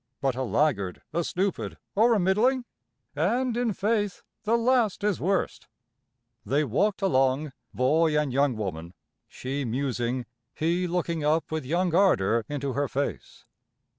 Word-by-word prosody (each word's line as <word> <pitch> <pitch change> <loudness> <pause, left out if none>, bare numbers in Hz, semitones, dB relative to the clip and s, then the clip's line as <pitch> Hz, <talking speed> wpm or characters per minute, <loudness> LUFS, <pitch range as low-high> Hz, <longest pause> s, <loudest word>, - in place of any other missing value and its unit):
But 135 -2 +1
a 130 - -3
laggard, 125 -8 0
a 170 - +1
stupid, 190 +3 -2 0.2
or 230 +3 +4
a - - +2
middling! 230 +8 +2 0.5
And, 230 - +1
in 240 -2 +1
faith, 205 0 -1 0.2
the 230 +2 +3
last 235 -4 +2
is 210 -3 0
worst." 195 +2 -1 0.8
They 145 +4 +1
walked 195 - 0
along, 135 -3 +2 0.2
boy 150 +4 +2
and 145 -4 -1
young 140 -3 +2
woman, 85 -4 -5 0.3
she 135 +2 -4
musing, 125 0 -2 0.3
he 175 +3 0
looking 170 -2 -1
up 155 +2 +1
with 155 -5 -3
young 175 +3 +1
ardor 115 - +3
into 140 -2 -3
her 140 +2 0
face. 140 +2 -4
155 Hz, 140 wpm, -27 LUFS, 130-195 Hz, 0.8 s, or